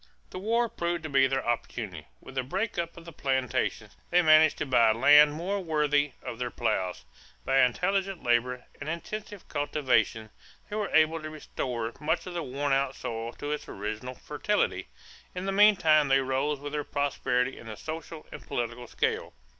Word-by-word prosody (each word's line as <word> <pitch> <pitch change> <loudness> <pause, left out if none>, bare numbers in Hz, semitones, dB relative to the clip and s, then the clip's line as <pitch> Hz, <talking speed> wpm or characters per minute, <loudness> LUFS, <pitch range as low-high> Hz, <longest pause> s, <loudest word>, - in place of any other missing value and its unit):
The 185 - -6
war 230 +4 +1
proved 175 -6 -3
to 155 - -4
be 135 -1 +4
their 135 0 -1
opportunity. 120 -1 -3
With - - -12
the 130 - 0
break 190 - -2
up 170 0 -4
of 170 - -11
the 170 - -9
plantations, 130 -3 -1
they 180 0 +4
managed 155 -1 +6
to - - -2
buy 120 -4 +5
land 145 +5 +7
more 185 +6 -2
worthy 150 -3 +1
of 115 - -6
their 125 -1 -2
plows. 90 - -2 0.4
By 135 0 +3
intelligent 185 +8 +1
labor 125 +1 +1
and - - -5
intensive 205 +4 -6
cultivation 130 -7 0 0.4
they - - -3
were 210 -3 -1
able 160 +1 +3
to 155 - -6
restore 125 -6 -4
much 160 +3 0
of 180 - -6
the 175 - -2
worn 140 0 -1
out 135 0 +1
soil 115 +1 -5
to 145 - -5
its 150 - -4
original 110 +5 -5
fertility. - - -1 0.5
In 180 +1 -4
the 195 - 0
meantime 185 -7 +5
they 135 0 +4
rose 135 +2 -1
with 145 +1 -7
their 150 -1 -1
prosperity 135 -3 -1
in 120 - -11
the 110 -2 -7
social 160 0 -7
and - - -8
political 120 0 -4
scale. - - -2
145 Hz, 180 wpm, -28 LUFS, 125-170 Hz, 0.5 s, land